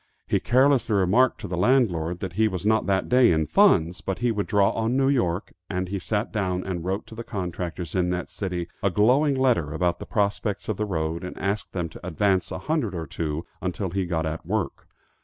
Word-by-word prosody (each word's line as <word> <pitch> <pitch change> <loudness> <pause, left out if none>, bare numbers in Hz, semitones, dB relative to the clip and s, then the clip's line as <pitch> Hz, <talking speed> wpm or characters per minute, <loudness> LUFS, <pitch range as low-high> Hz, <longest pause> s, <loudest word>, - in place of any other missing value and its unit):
He - - +2
carelessly 130 -3 +3
remarked 100 +7 +3
to - - -5
the 90 - -3
landlord 90 -8 +2
that 95 -3 -4
he 110 +3 +3
was 95 -2 -4
not 110 +1 +2
that 95 -1 +1
day 125 -3 +5
in 80 -1 +2
funds, 80 +4 +3
but 95 - -3
he 120 -1 +1
would 105 -2 -2
draw 100 -2 +3
on 115 +3 0
New 135 0 +3
York, 95 -9 0 0.2
and 90 -1 -2
he 100 0 -2
sat 105 +4 -2
down 95 -4 -1
and 90 -3 -4
wrote 95 +3 -2
to - - -13
the 115 +1 -6
contractors 90 -5 -4
in 90 -1 +1
that 90 0 -2
city 90 -4 -4
a 100 - +2
glowing 130 - +3
letter 120 - +2
about 85 +2 0
the - - -8
prospects 100 0 -1
of 110 - -2
the 105 - -1
road, 80 -3 -2
and 90 - -7
asked 100 +2 -2
them 90 -3 -2
to 80 - -13
advance 95 +2 +1
a - - -3
hundred 120 - -1
or 80 -1 -3
two, 80 +1 -4 0.2
until 95 0 -3
he 95 -1 -1
got 80 -2 -1
at 80 0 -4
work. 100 +2 -3
95 Hz, 220 wpm, -25 LUFS, 85-110 Hz, 0.2 s, day